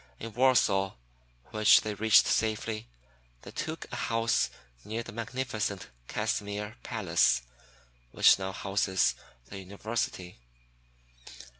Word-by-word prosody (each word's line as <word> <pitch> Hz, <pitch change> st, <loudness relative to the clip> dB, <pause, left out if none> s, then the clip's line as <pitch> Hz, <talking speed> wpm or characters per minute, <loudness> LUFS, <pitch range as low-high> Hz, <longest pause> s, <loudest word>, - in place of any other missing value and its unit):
In 115 Hz, -1 st, -8 dB
Warsaw, 110 Hz, -7 st, +3 dB, 0.6 s
which 110 Hz, -1 st, +6 dB
they 110 Hz, -, -3 dB
reached 110 Hz, +1 st, +5 dB
safely, 110 Hz, 0 st, -1 dB, 0.6 s
they -, -, -10 dB
took -, -, -5 dB
a -, -, -3 dB
house 115 Hz, 0 st, +1 dB, 0.3 s
near 115 Hz, +2 st, -4 dB
the 115 Hz, -, -9 dB
magnificent 115 Hz, -3 st, -3 dB, 0.2 s
Casimr 105 Hz, +1 st, -3 dB
Palace 60 Hz, 0 st, +1 dB, 0.7 s
which -, -, +5 dB
now 95 Hz, 0 st, -3 dB
houses 95 Hz, -1 st, +1 dB, 0.3 s
the 100 Hz, -, -9 dB
University. 95 Hz, -, -4 dB
105 Hz, 105 wpm, -29 LUFS, 95-115 Hz, 0.7 s, which